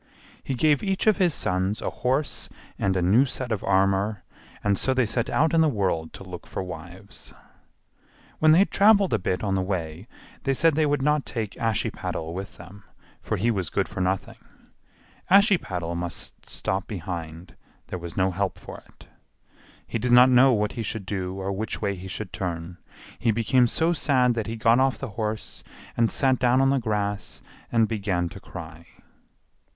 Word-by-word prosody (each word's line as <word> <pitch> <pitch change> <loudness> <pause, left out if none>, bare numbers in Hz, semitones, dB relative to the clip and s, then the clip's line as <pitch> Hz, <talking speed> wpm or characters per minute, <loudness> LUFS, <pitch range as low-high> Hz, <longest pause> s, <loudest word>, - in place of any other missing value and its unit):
He 135 - -3
gave 150 +2 +3
each 195 -2 -1
of 215 -2 +4
his 180 -4 +3
sons 95 -4 -1
a - - -3
horse 135 +4 -2 0.3
and 95 -1 +1
a 90 - +1
new 105 +9 +5
suit 130 -3 -4
of 110 - -2
armor, 95 +2 +1 0.4
and 100 -1 +2
so 130 +6 0
they 130 -2 +3
set 115 +2 -1
out 160 +2 +2
in 165 - +5
the 160 - +4
world 95 - -1
to - - -9
look 90 -2 -9
for - - -4
wives. 90 +3 -10 1.0
When 155 0 +5
they 160 - +7
had 195 - +3
traveled 200 -1 +5
a - - +2
bit 90 +1 -2
on 100 -2 0
the 95 - +1
way 90 0 -4 0.3
they 135 -1 0
said 165 +3 +4
they 155 +1 +2
would 145 -2 0
not 150 0 +2
take 110 -5 -4
Ashiepattle 100 -7 -2
with 95 +2 -7
them, 95 +4 -13 0.4
for - - -2
he 120 - +1
was 95 -6 -2
good 100 - 0
for 100 -2 -5
nothing. 95 +1 -2 0.9
Ashiepattle 175 - +3
must 85 0 -6
stop 95 0 -2
behind; 85 -3 -6 0.3
there 90 - -4
was 85 -1 -8
no 95 0 +2
help 95 +1 -2
for - - -10
it. - - -19 0.8
He 115 - -3
did 125 +3 -1
not 125 +1 +7
know 130 +2 +6
what 105 -3 +1
he 115 - -5
should 110 -2 -4
do 95 -1 -3
or 95 +1 -2
which 105 +3 -3
way 100 -2 -1
he 95 0 -8
should 95 0 -6
turn; 85 -1 -5 0.4
he 120 - +1
became 115 +3 +3
so 160 +8 +2
sad 130 -6 +2
that 115 -2 -3
he 115 - -4
got 115 +2 +3
off 130 -4 +2
the 135 - -6
horse 110 0 -4 0.3
and 115 -1 +2
sat 130 -2 +2
down 125 +1 +3
on 135 0 +4
the 135 - +2
grass 105 -3 -3 0.3
and 115 -1 +3
began 95 -6 -1
to 95 - -10
cry. 85 -3 -10
105 Hz, 190 wpm, -25 LUFS, 95-130 Hz, 1.0 s, they